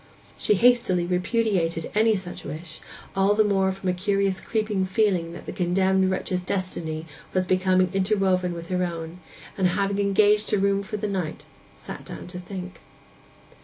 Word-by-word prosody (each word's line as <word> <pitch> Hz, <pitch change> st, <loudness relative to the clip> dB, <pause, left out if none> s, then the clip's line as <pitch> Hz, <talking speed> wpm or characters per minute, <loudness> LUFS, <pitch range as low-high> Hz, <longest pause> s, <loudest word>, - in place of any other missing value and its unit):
She 210 Hz, -, +2 dB
hastily 225 Hz, -6 st, +4 dB
repudiated 180 Hz, -3 st, 0 dB
any 220 Hz, +1 st, +4 dB
such 185 Hz, -2 st, -6 dB
wish, 155 Hz, +2 st, -7 dB, 0.4 s
all 195 Hz, +2 st, +3 dB
the 215 Hz, -, +5 dB
more 195 Hz, -2 st, +2 dB
from 190 Hz, 0 st, -6 dB
a -, -, +2 dB
curious 195 Hz, 0 st, 0 dB
creeping 215 Hz, -3 st, -1 dB
feeling 185 Hz, -3 st, +1 dB
that 175 Hz, -, -9 dB
the -, -, -5 dB
condemned 190 Hz, +1 st, +2 dB
wretch's 185 Hz, -1 st, -1 dB
destiny 175 Hz, -4 st, -3 dB, 0.3 s
was 185 Hz, 0 st, +2 dB
becoming 185 Hz, 0 st, +2 dB
interwoven 190 Hz, -2 st, +1 dB
with 170 Hz, 0 st, -8 dB
her 180 Hz, -1 st, 0 dB
own; 170 Hz, 0 st, -5 dB, 0.4 s
and 190 Hz, -2 st, +2 dB
having 195 Hz, +2 st, 0 dB
engaged 205 Hz, +1 st, +3 dB
a -, -, +4 dB
room 200 Hz, 0 st, +2 dB
for 210 Hz, +1 st, -5 dB
the 210 Hz, +1 st, -2 dB
night, 185 Hz, -6 st, -3 dB, 0.3 s
sat -, -, -9 dB
down -, -, -8 dB
to 180 Hz, 0 st, -7 dB
think. 185 Hz, 0 st, -7 dB
190 Hz, 165 wpm, -25 LUFS, 180-200 Hz, 0.4 s, the